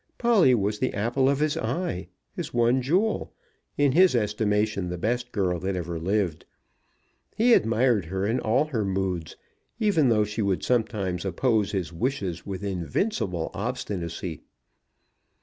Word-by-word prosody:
Polly 205 - +4
was 105 -1 -1
the 130 - -1
apple 120 +6 +1
of 140 - +2
his 150 -1 +1
eye; 115 - -2 0.3
his - - -5
one 120 +2 +2
jewel; 185 - 0 0.4
in 145 -1 +3
his 180 0 +5
estimation 105 -3 0
the 90 - -4
best 120 +6 -2
girl 90 -4 0
that 95 +2 -2
ever 85 -2 -4
lived. 90 -2 -1 0.9
He 235 +2 +4
admired 115 - +3
her 95 +4 -2
in 115 +5 +1
all 120 +6 +2
her 125 -8 -2
moods, 95 -4 -2 0.4
even 185 - +3
though 105 -2 +3
she 105 +2 -4
would 100 -3 0
sometimes 110 -7 0
oppose 105 +3 +1
his 90 -4 -3
wishes 95 -4 -3
with 95 -1 -5
invincible 95 - -2
obstinacy. 95 - -4
105 Hz, 145 wpm, -26 LUFS, 95-130 Hz, 0.9 s, his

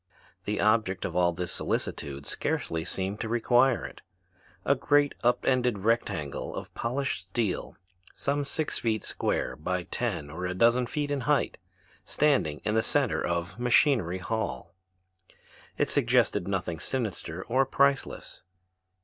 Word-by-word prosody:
The 105 0 -1
object 105 -3 +2
of 85 - -4
all 90 -1 +4
this 90 +1 -3
solicitude 70 0 -3
scarcely 80 0 -2
seemed 95 +4 -3
to 110 - -3
require 120 +2 +3
it. - - -9 0.6
A 140 - +5
great 145 +1 +3
up 120 +1 +2
ended 125 -4 +2
rectangle 95 -9 -1
of - - -7
polished 125 -6 -2
steel 110 -1 -2 0.4
some 145 +1 -1
six 150 +2 -2
feet 110 -3 0
square - - -1
by 90 +4 -2
ten 85 -10 -3
or 90 +4 -3
a 90 - -3
dozen 120 +4 +4
feet 145 +3 -2
in 140 -2 0
height, 150 - +2 0.4
standing 135 - +1
in 105 - +1
the 110 - +3
center - - +1
of 85 +4 -2
Machinery 120 - +3
Hall, 95 - -3 1.0
it - - +2
suggested 90 - +2
nothing 90 -4 -2
sinister 95 -6 -3
or 130 +3 +2
priceless. 140 +1 0
110 Hz, 140 wpm, -28 LUFS, 90-130 Hz, 1.0 s, A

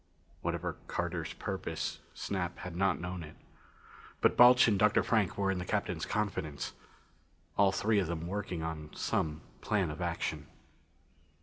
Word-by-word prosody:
Whatever - - -2
Carter's - - -2
purpose, - - -3 0.2
Snap 90 -3 -3
had 90 -2 -7
not 95 +2 +2
known 90 0 -4
it. 75 -2 -9 0.8
But - - +4
Balch 125 0 +8
and 105 -4 +3
Dr. 105 0 +4
Frank 110 -6 +1
were 100 -1 +2
in 95 - -1
the - - -2
Captain's - - -1
confidence 95 -8 -2 0.8
all 100 -1 +5
three 105 +2 +2
of 95 - 0
them 85 0 -3
working 90 -3 -3
on 80 -2 -4
some 75 -1 -1 0.2
plan 95 -7 +1
of 75 - -7
action. 85 -3 -2
90 Hz, 145 wpm, -32 LUFS, 80-100 Hz, 0.8 s, Balch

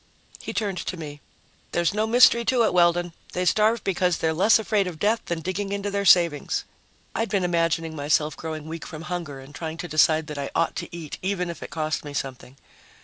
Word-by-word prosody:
He - - -6
turned 200 -5 -2
to 185 - -4
me. 145 -3 -8 0.5
"There's 175 +1 +1
no 215 +1 0
mystery 235 0 +6
to 245 -1 +3
it, 220 - +2
Weldon. 175 -1 +3 0.2
They 180 - -1
starve 215 +5 +3
because 180 -2 +1
they're 160 0 0
less 195 +7 +5
afraid 215 -3 0
of 175 -3 -6
death 215 +6 +1
than 170 -1 -3
digging 190 +4 -3
into 200 0 -2
their 200 0 -1
savings." 170 -6 +4 0.5
I'd 225 -1 -1
been 195 -2 +1
imagining 165 -2 0
myself 150 +1 +1
growing 155 -1 -6
weak 165 0 -6
from 155 0 -8
hunger 170 -6 -5
and 135 +2 -13
trying 160 +1 -5
to 175 - -5
decide 155 0 +3
that 150 -2 -6
I 140 - -3
ought 165 - +1
to - - -5
eat 160 -4 -7
even 180 -2 -1
if 170 - -11
it - - -7
cost 155 -1 -2
me 145 -1 -8
something. 130 -1 -5
170 Hz, 210 wpm, -25 LUFS, 155-200 Hz, 0.5 s, mystery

